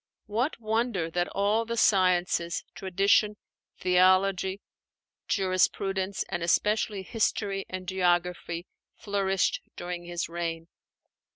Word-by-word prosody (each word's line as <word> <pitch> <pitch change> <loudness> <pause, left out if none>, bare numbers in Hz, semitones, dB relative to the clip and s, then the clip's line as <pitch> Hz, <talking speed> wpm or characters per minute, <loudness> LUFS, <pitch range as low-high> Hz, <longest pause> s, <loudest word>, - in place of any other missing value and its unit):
What 230 +8 -1
wonder 220 -6 -1
that 175 +1 0
all 205 +3 +1
the 235 +1 -4
sciences 180 -4 +2
Tradition, 200 +3 +2 0.4
Theology, 185 +1 +3 0.7
Jurisprudence, 190 0 0
and 175 - -3
especially 205 +3 +1
History 200 -2 -1
and 185 -1 -6
Geography 175 -2 0 0.3
flourished 195 -2 0
during 175 0 -5
his 175 0 -3
reign. 165 0 -4
190 Hz, 95 wpm, -28 LUFS, 175-205 Hz, 0.7 s, Theology